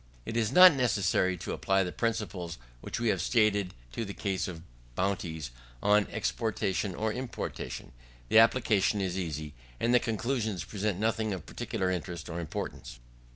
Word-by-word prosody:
It 115 Hz, -, -4 dB
is 110 Hz, -2 st, +1 dB
not 180 Hz, -1 st, +10 dB
necessary 100 Hz, -7 st, +2 dB
to -, -, -5 dB
apply 95 Hz, 0 st, +2 dB
the 90 Hz, -, -3 dB
principles 95 Hz, -7 st, -2 dB, 0.2 s
which -, -, -5 dB
we 120 Hz, -1 st, +1 dB
have 95 Hz, -5 st, +1 dB
stated 105 Hz, -3 st, +2 dB, 0.2 s
to 115 Hz, -, -3 dB
the 100 Hz, -2 st, -6 dB
case 95 Hz, -4 st, -1 dB
of 85 Hz, -3 st, -7 dB, 0.3 s
bounties 85 Hz, -7 st, -2 dB, 0.3 s
on 105 Hz, 0 st, +4 dB
exportation 105 Hz, -3 st, -1 dB
or 110 Hz, 0 st, -1 dB
importation. 125 Hz, -, -5 dB, 0.4 s
The 110 Hz, -, +6 dB
application 110 Hz, -3 st, +4 dB
is 95 Hz, -2 st, -1 dB
easy, 75 Hz, -5 st, -4 dB, 0.3 s
and 120 Hz, -, +2 dB
the 125 Hz, -, +7 dB
conclusions 110 Hz, -, -1 dB
present 100 Hz, +1 st, -2 dB
nothing 110 Hz, -1 st, 0 dB
of 90 Hz, -, -9 dB
particular 95 Hz, -1 st, -2 dB
interest 90 Hz, -2 st, -4 dB
or 85 Hz, -, -3 dB
importance. 75 Hz, -6 st, -5 dB
100 Hz, 155 wpm, -30 LUFS, 90-110 Hz, 0.4 s, not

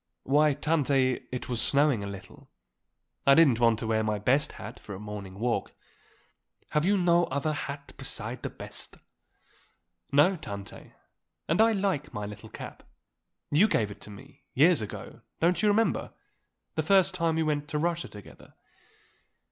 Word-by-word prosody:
"Why, 145 Hz, +1 st, +3 dB
Tante, 140 Hz, -4 st, +1 dB
it 125 Hz, +1 st, -4 dB
was 120 Hz, -3 st, -1 dB
snowing 140 Hz, -4 st, +3 dB
a -, -, -4 dB
little; 100 Hz, -1 st, -10 dB, 0.8 s
I 140 Hz, -, +8 dB
didn't 140 Hz, -8 st, +5 dB
want 115 Hz, -2 st, +4 dB
to 115 Hz, -, -5 dB
wear 110 Hz, 0 st, +1 dB
my 105 Hz, -1 st, 0 dB
best 130 Hz, +8 st, +2 dB
hat 110 Hz, -, -9 dB
for 100 Hz, -, -8 dB
a -, -, -8 dB
morning 100 Hz, -2 st, -7 dB
walk." 120 Hz, +2 st, -1 dB, 1.0 s
"Have 150 Hz, +1 st, +1 dB
you 200 Hz, +2 st, +3 dB
no 175 Hz, -1 st, +4 dB
other 140 Hz, +3 st, -1 dB
hat 140 Hz, -1 st, -6 dB
beside -, -, -4 dB
the -, -, -3 dB
best?" -, -, -5 dB, 1.1 s
"No, 150 Hz, +7 st, +4 dB
Tante. 100 Hz, -9 st, -9 dB, 0.5 s
And 165 Hz, +7 st, +3 dB
I 225 Hz, 0 st, +5 dB
like 190 Hz, -, -1 dB
my 105 Hz, 0 st, -3 dB
little 105 Hz, +1 st, -9 dB
cap. -, -, -9 dB, 0.7 s
You 175 Hz, +9 st, +5 dB
gave 105 Hz, -, 0 dB
it -, -, -12 dB
to -, -, -10 dB
me 130 Hz, +8 st, -14 dB
years 155 Hz, +3 st, +5 dB
ago 105 Hz, -, -8 dB, 0.2 s
don't 175 Hz, +2 st, +2 dB
you 215 Hz, -, +3 dB
remember; 220 Hz, +2 st, +1 dB, 0.6 s
the -, -, 0 dB
first 190 Hz, -1 st, +4 dB
time 165 Hz, -3 st, 0 dB
that -, -, 0 dB
we -, -, +2 dB
went 150 Hz, -1 st, -1 dB
to 150 Hz, -, -3 dB
Russia 170 Hz, +2 st, -1 dB
together." 105 Hz, -2 st, -14 dB
140 Hz, 165 wpm, -28 LUFS, 110-165 Hz, 1.1 s, I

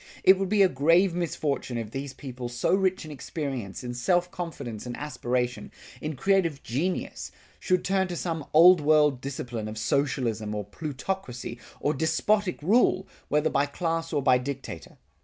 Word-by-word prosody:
It 190 Hz, 0 st, +7 dB
would 195 Hz, -1 st, -1 dB
be 205 Hz, -1 st, +5 dB
a -, -, +7 dB
grave 165 Hz, +5 st, +3 dB
misfortune 155 Hz, -7 st, -2 dB
if 110 Hz, -2 st, -5 dB
these 135 Hz, +1 st, -4 dB
people 130 Hz, -2 st, -7 dB
so 120 Hz, +7 st, 0 dB
rich 190 Hz, -2 st, +1 dB
in 155 Hz, -, -8 dB
experience, 135 Hz, -, -5 dB
in 120 Hz, 0 st, -4 dB
self 175 Hz, +9 st, +1 dB
confidence 135 Hz, -, -6 dB
and 120 Hz, -, -5 dB
aspiration, 125 Hz, -4 st, -2 dB, 0.3 s
in 155 Hz, 0 st, -3 dB
creative 170 Hz, -2 st, +1 dB
genius, 165 Hz, +10 st, -2 dB, 0.3 s
should 185 Hz, -2 st, +1 dB
turn 190 Hz, 0 st, +2 dB
to 175 Hz, -, -4 dB
some 165 Hz, -3 st, -3 dB
Old 170 Hz, +2 st, +8 dB
World 150 Hz, -3 st, +4 dB
discipline 120 Hz, -5 st, -4 dB
of 110 Hz, 0 st, -6 dB
socialism 115 Hz, -3 st, 0 dB
or 105 Hz, -, -2 dB
plutocracy, 130 Hz, -, -5 dB, 0.2 s
or 145 Hz, -, +1 dB
despotic 175 Hz, +5 st, +1 dB
rule, 195 Hz, 0 st, +3 dB, 0.2 s
whether 150 Hz, +1 st, +1 dB
by 140 Hz, -, +2 dB
class 165 Hz, +2 st, -2 dB
or 145 Hz, -4 st, 0 dB
by 125 Hz, -1 st, +5 dB
dictator. 130 Hz, -9 st, -7 dB
150 Hz, 160 wpm, -27 LUFS, 125-175 Hz, 0.3 s, Old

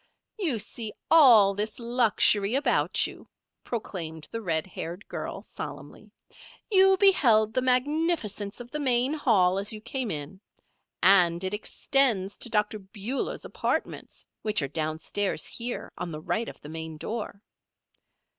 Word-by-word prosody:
"You 320 Hz, -, 0 dB
see 220 Hz, 0 st, -5 dB, 0.2 s
all 235 Hz, -11 st, +7 dB
this 210 Hz, +2 st, -3 dB
luxury 235 Hz, -3 st, +2 dB
about 280 Hz, -, +2 dB
you," -, -, -10 dB, 0.3 s
proclaimed 165 Hz, -9 st, -5 dB
the 230 Hz, -, -4 dB
red 165 Hz, -6 st, 0 dB
haired 180 Hz, +1 st, -7 dB
girl, -, -, -6 dB
solemnly. -, -, -9 dB, 0.6 s
"You 385 Hz, -1 st, +5 dB
beheld 230 Hz, -, +4 dB
the 255 Hz, -, +1 dB
magnificence 255 Hz, -, 0 dB
of 245 Hz, 0 st, -10 dB
the 300 Hz, -, -3 dB
main 255 Hz, 0 st, +2 dB
hall 195 Hz, -11 st, +2 dB
as 200 Hz, +1 st, +2 dB
you 215 Hz, -, -5 dB
came 235 Hz, +2 st, -3 dB
in. 155 Hz, +5 st, -5 dB, 0.6 s
And 180 Hz, -2 st, +5 dB
it 190 Hz, +1 st, -2 dB
extends 210 Hz, -2 st, +1 dB
to 240 Hz, -, -1 dB
Dr. 210 Hz, 0 st, 0 dB
Beulah's 205 Hz, +6 st, -5 dB
apartments, -, -, -4 dB, 0.2 s
which 210 Hz, -7 st, 0 dB
are -, -, -1 dB
downstairs 160 Hz, +4 st, -2 dB
here, 240 Hz, +1 st, -4 dB
on 170 Hz, -, -4 dB
the 150 Hz, -, -6 dB
right 230 Hz, +8 st, -2 dB
of -, -, -13 dB
the 150 Hz, -, -10 dB
main 160 Hz, 0 st, -6 dB
door. 210 Hz, +2 st, -6 dB
215 Hz, 140 wpm, -27 LUFS, 190-250 Hz, 0.6 s, all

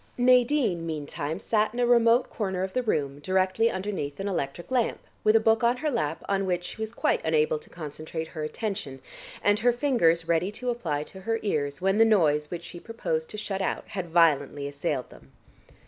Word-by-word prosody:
Nadine 250 Hz, -, +3 dB
meantime 150 Hz, 0 st, -4 dB
sat 215 Hz, +1 st, 0 dB
in -, -, -3 dB
a 245 Hz, -, +3 dB
remote 240 Hz, +1 st, +4 dB
corner 190 Hz, -4 st, -2 dB
of 190 Hz, -, -4 dB
the 255 Hz, -, +1 dB
room 145 Hz, -, -1 dB
directly 185 Hz, +7 st, +2 dB
underneath 190 Hz, -8 st, -4 dB
an 195 Hz, -, -2 dB
electric 170 Hz, -, -3 dB
lamp, 250 Hz, -3 st, +1 dB, 0.3 s
with 215 Hz, +1 st, +4 dB
a -, -, +7 dB
book 225 Hz, +1 st, +2 dB
on 240 Hz, +1 st, +3 dB
her 300 Hz, +3 st, -1 dB
lap 165 Hz, -, -2 dB
on 195 Hz, -1 st, 0 dB
which 180 Hz, -1 st, 0 dB
she 220 Hz, -, -8 dB
was 220 Hz, 0 st, -3 dB
quite 235 Hz, -, 0 dB
unable 460 Hz, 0 st, +2 dB
to 455 Hz, -, -17 dB
concentrate 160 Hz, 0 st, -6 dB
her 155 Hz, -, -5 dB
attention, 155 Hz, -, -4 dB, 0.4 s
and 205 Hz, 0 st, +3 dB
her 245 Hz, +2 st, +4 dB
fingers 200 Hz, -, +2 dB
ready 170 Hz, +3 st, +1 dB
to 245 Hz, +3 st, -2 dB
apply 160 Hz, -11 st, -2 dB
to 190 Hz, +5 st, -12 dB
her 225 Hz, +4 st, 0 dB
ears 145 Hz, -7 st, -1 dB
when 195 Hz, +3 st, +2 dB
the -, -, +8 dB
noise 155 Hz, -9 st, +3 dB
which 175 Hz, -1 st, -5 dB
she 175 Hz, 0 st, -9 dB
proposed 165 Hz, -8 st, -3 dB
to 215 Hz, -, -7 dB
shut 200 Hz, -2 st, -3 dB
out -, -, -2 dB
had 185 Hz, -4 st, -4 dB
violently 145 Hz, -4 st, +3 dB
assailed 140 Hz, -2 st, -3 dB
them. -, -, -17 dB
190 Hz, 200 wpm, -27 LUFS, 160-230 Hz, 0.4 s, the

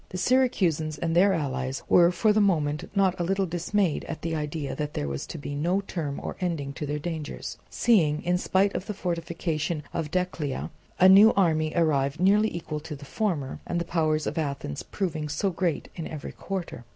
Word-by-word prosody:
The 185 Hz, -, -5 dB
Syracusans 180 Hz, -, +2 dB
and 165 Hz, +2 st, -1 dB
their 195 Hz, +3 st, +6 dB
allies 135 Hz, -5 st, -2 dB
were 175 Hz, 0 st, +6 dB
for 210 Hz, +5 st, +3 dB
the 215 Hz, -, +3 dB
moment 155 Hz, -6 st, +1 dB
not 190 Hz, -2 st, +2 dB
a -, -, +1 dB
little 195 Hz, +2 st, +1 dB
dismayed 175 Hz, 0 st, 0 dB
at 160 Hz, -, -6 dB
the 165 Hz, 0 st, -2 dB
idea 150 Hz, -3 st, -3 dB
that 150 Hz, +1 st, -4 dB
there 75 Hz, -, -2 dB
was 70 Hz, 0 st, -4 dB
to -, -, -6 dB
be 145 Hz, -1 st, -6 dB
no 175 Hz, +7 st, +1 dB
term 160 Hz, -7 st, -4 dB
or -, -, -4 dB
ending 155 Hz, -6 st, -2 dB
to 150 Hz, -, -5 dB
their 150 Hz, +1 st, -1 dB
dangers, 160 Hz, -1 st, -5 dB
seeing, 160 Hz, -11 st, +2 dB
in 180 Hz, +1 st, +1 dB
spite 195 Hz, +2 st, +2 dB
of 185 Hz, -, -4 dB
the 210 Hz, -, -4 dB
fortification 170 Hz, -3 st, -2 dB
of 160 Hz, -3 st, -2 dB
Decelea, 175 Hz, -5 st, -2 dB, 0.3 s
a 185 Hz, -, +8 dB
new 200 Hz, +4 st, +8 dB
army 155 Hz, -5 st, +2 dB
arrive 150 Hz, -3 st, +1 dB
nearly 205 Hz, +4 st, +4 dB
equal 165 Hz, -3 st, -4 dB
to 150 Hz, 0 st, -7 dB
the 140 Hz, 0 st, -11 dB
former, 150 Hz, -5 st, -2 dB
and 175 Hz, -, -1 dB
the 170 Hz, -, -2 dB
power 160 Hz, -2 st, +1 dB
of 155 Hz, +1 st, -2 dB
Athens 140 Hz, -, -3 dB
proving 155 Hz, -6 st, -3 dB
so 170 Hz, +6 st, 0 dB
great 170 Hz, -3 st, -1 dB
in 165 Hz, -, -5 dB
every 155 Hz, -3 st, -6 dB
quarter. 185 Hz, -10 st, -5 dB
165 Hz, 200 wpm, -27 LUFS, 150-185 Hz, 0.3 s, a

